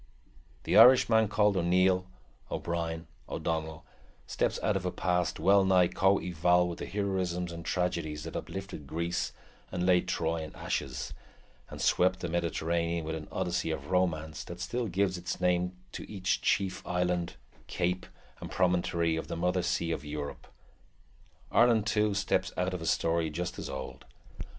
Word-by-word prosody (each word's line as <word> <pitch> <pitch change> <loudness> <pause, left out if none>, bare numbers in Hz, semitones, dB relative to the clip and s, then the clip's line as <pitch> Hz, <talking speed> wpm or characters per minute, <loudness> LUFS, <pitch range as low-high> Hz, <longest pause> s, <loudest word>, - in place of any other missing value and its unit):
The - - +2
Irishman 115 -3 +7
called 105 -1 +2
O'Neill, 90 +1 +3 0.4
O'Brien, 85 -1 -3 0.2
O'Donnell, 80 -1 -3 0.4
steps - - -1
out 105 - +2
of 95 - -1
a 90 - 0
past 90 -2 0
well 100 +1 +5
nigh 90 -2 +4
co 95 +1 +3
eval 90 0 +2
with 85 - -5
the - - -5
heroisms 95 -3 -1
and 85 0 -7
tragedies 85 -4 -2
that 80 - -7
uplifted 95 -7 -6
Greece 85 -5 -2 0.4
and 90 -1 -1
laid 90 -1 +3
Troy 80 0 -1
in 80 -1 -8
ashes, 65 -1 -3 0.6
and - - -9
swept 95 +1 +2
the 90 - -3
Mediterranean 85 0 -1
with 80 - -3
an 80 -1 -6
Odyssey 90 -3 -1
of 80 - -4
romance 80 -4 0
that - - -8
still 120 -1 -2
gives 95 -1 0
its 85 +1 -4
name 90 0 +1 0.2
to - - -8
each 95 -2 -1
chief 95 -2 +1
island, 90 -1 -1 0.3
cape, 90 +1 -1 0.3
and - - -7
promontory 85 -2 +1
of 80 - -4
the - - -4
mother 90 +2 +1
sea 85 -1 -1
of 80 - -3
Europe. 75 -1 -6 1.0
Ireland, 115 -3 +4
too, 105 -1 +1
steps 100 -1 0
out 90 +1 0
of 90 - -4
a 80 - -4
story 80 -1 +1
just 85 +3 -4
as - - -5
old. - - -7
90 Hz, 160 wpm, -30 LUFS, 85-95 Hz, 1.0 s, Irishman